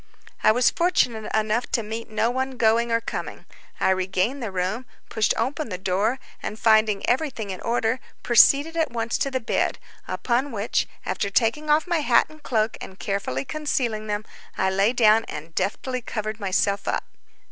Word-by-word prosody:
I - - +6
was 245 +2 +4
fortunate 250 -11 +1
enough 220 +2 0
to 230 - +1
meet 225 +2 -6
no 220 +2 +1
one, 260 0 -2
going 230 +1 +3
or 230 - +3
coming. - - -6 0.3
I - - +3
regained 190 +8 0
the 225 -4 -3
room, 190 +7 -2 0.2
pushed 220 -1 +1
open 270 +4 -2
the 180 - -3
door, 195 +7 0 0.2
and 215 - -5
finding 215 -2 +3
everything 245 -6 -1
in 185 - -6
order, 230 +1 0 0.2
proceeded 280 +7 +5
at 325 -1 +1
once 230 0 -2
to 275 - +1
the 260 -1 -1
bed, 230 - 0 0.3
upon 255 +4 -1
which, 210 0 -1 0.2
after 200 - -1
taking 235 +9 +1
off 300 +1 +4
my 345 -2 +1
hat 295 - +4
and 310 0 -15
cloak 220 -5 0
and 190 - -9
carefully 195 -11 -2
concealing 245 -8 -2
them, 210 +1 -2 0.3
I 190 - +2
lay 195 +4 +3
down 225 -2 +5
and 165 +2 -8
deftly 250 +8 -2
covered 215 -1 -4
myself 200 0 0
up. - - 0
225 Hz, 175 wpm, -24 LUFS, 205-255 Hz, 0.3 s, I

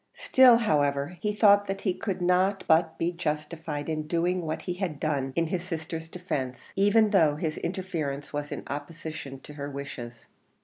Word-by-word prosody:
Still, 255 -3 +6
however, 145 -5 +1
he 210 - 0
thought 205 -1 +5
that 195 0 -3
he 190 - +1
could 185 -1 -3
not 185 +2 +2
but 160 0 +3
be 170 +1 0
justified 155 -2 -3
in 155 -1 -2
doing 170 +1 0
what 155 - -3
he 180 - -2
had 175 -6 -3
done 140 -3 -1
in 170 - +2
his 175 +2 -2
sister's 165 -2 -5
defence, 145 -8 -5
even 205 +2 +4
though 160 -7 +4
his 155 0 -3
interference 160 -7 -3
was 145 0 -3
in - - -5
opposition 150 -1 -6
to 150 - -11
her 145 -1 -5
wishes. 120 -4 -7
165 Hz, 175 wpm, -27 LUFS, 145-185 Hz, -, Still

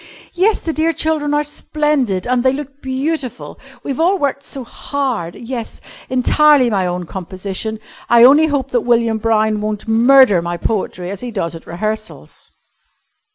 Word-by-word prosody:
"Yes, 400 +5 +2
the 325 - -3
dear 320 +2 +1
children 310 -1 0
are 295 - +2
splendid, 295 -9 -1
and 250 0 +1
they 260 0 +3
look 280 0 -7
beautiful! 265 0 -4 0.2
We've 275 +1 -4
all 360 +4 +3
worked 280 -3 -1
so 275 -1 -7
hard. 240 - -3
Yes, 235 -1 -6 0.3
entirely 260 0 +4
my 190 -3 +1
own 180 0 -3
composition. 190 +4 -5 0.3
I 235 0 +6
only 290 +5 +7
hope 275 -3 -2
that 245 - +1
William 230 -1 +1
Brown 215 -1 +1
won't 215 0 -4
murder 230 -3 +5
my 170 0 -4
poetry 185 -2 -3
as 200 - -7
he 245 - -5
does 190 -7 -3
at 165 - -11
rehearsals." 215 +5 -6
245 Hz, 155 wpm, -17 LUFS, 210-285 Hz, 0.3 s, only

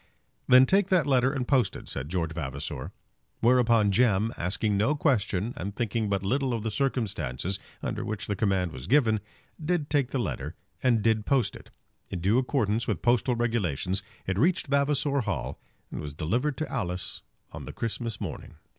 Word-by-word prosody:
"Then 130 +1 +8
take 195 +5 +3
that 185 -4 +3
letter 130 -2 +3
and 130 -4 -2
post 130 -8 +2
it," - - -9
said 70 +1 -4
George 85 -3 -1
Vavasor. 70 -4 -5 0.5
Whereupon 115 -3 +4
Jem, 110 +1 +3
asking 100 +4 0
no 110 +10 +2
question 115 - +1
and 100 +3 -5
thinking 115 -2 -1
but 100 -1 0
little 130 +4 +1
of 110 - -4
the 110 - -2
circumstances 100 - -1 0.2
under - - -2
which 105 -3 -4
the 105 - -2
command 95 -3 +1
was 65 0 -8
given, 115 -5 +4 0.4
did 155 -2 -1
take 140 -4 +2
the 135 - -2
letter 75 - -3 0.3
and 120 -5 +3
did 110 -2 +2
post 135 -4 +2
it. - - -12 0.4
In 95 - -4
due 100 +8 +3
accordance 120 -4 0
with - - -2
postal 120 +1 +3
regulations 95 - 0 0.2
it 95 +1 -1
reached 175 +7 +3
Vavasor 140 0 +1
Hall 65 - -3 0.3
and - - -4
was 75 -1 -7
delivered 125 - 0
to 155 - -2
Alice 90 -8 -3 0.3
on - - -8
the - - -6
Christmas 115 -1 -3
morning. 95 -7 -6
115 Hz, 175 wpm, -28 LUFS, 95-130 Hz, 0.5 s, Then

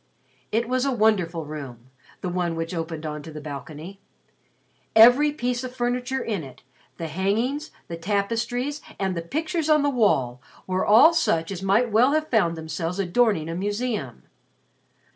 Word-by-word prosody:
It 230 +2 0
was 255 +1 0
a 275 - +1
wonderful 195 -8 +1
room 130 -5 -9 0.3
the 180 - -2
one 175 -2 -1
which 165 +1 -4
opened 165 -2 -4
on 150 -1 -4
to 160 - -10
the 150 - -7
balcony. 155 +6 -8 1.0
Each 275 +7 +7
piece 245 -1 -1
of 255 0 -7
furniture 250 +2 -1
in 205 -7 -3
it, 130 -2 -13 0.3
the 165 - -4
hangings, 225 - -1 0.2
the 170 - -6
tapestries, 230 - -2 0.2
and 190 -1 -1 0.2
pictures 320 +1 -1
on 305 -1 +5
the 285 - +2
wall 135 - +1 0.2
were 185 0 -1
all 245 +11 +7
such 170 - +1
as 190 -2 -5
might 210 +5 +2
well 245 +6 +4
have 310 0 0
found 175 -8 +2
themselves 165 +2 -4
adorning 195 -3 +1
a 165 - -4
museum. 205 - -3
200 Hz, 160 wpm, -24 LUFS, 165-245 Hz, 1.0 s, Each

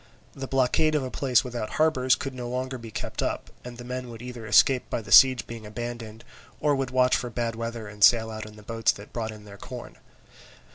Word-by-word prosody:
The 135 -1 -6
blockade 135 +4 +2
of 150 - +1
a 130 - -5
place 130 -4 +2
without 120 -3 -5
harbours 130 -5 +3
could 135 - -5
no 125 -1 -6
longer 130 +1 -3
be 115 -1 -9
kept - - -5
up; - - -3
and 120 -1 -9
the 120 - -8
men 125 0 -5
would 115 -1 -9
either 120 -2 -8
escape 125 +4 +4
by - - -1
the 110 - -10
siege 130 -2 +7
being 115 -1 -8
abandoned, 115 +1 -7 0.4
or 150 - +2
would 135 -1 -2
watch 125 0 +3
for 120 - -3
bad 115 0 -2
weather 115 -1 -5
and 105 0 -4
sail 110 0 +6
out 110 0 -6
in 105 - -13
the 105 - -14
boats 115 +1 +1
that 100 +1 -13
brought 115 -2 -3
in 105 -1 -12
their 100 -1 -12
corn. - - -9
120 Hz, 230 wpm, -26 LUFS, 110-130 Hz, 0.4 s, siege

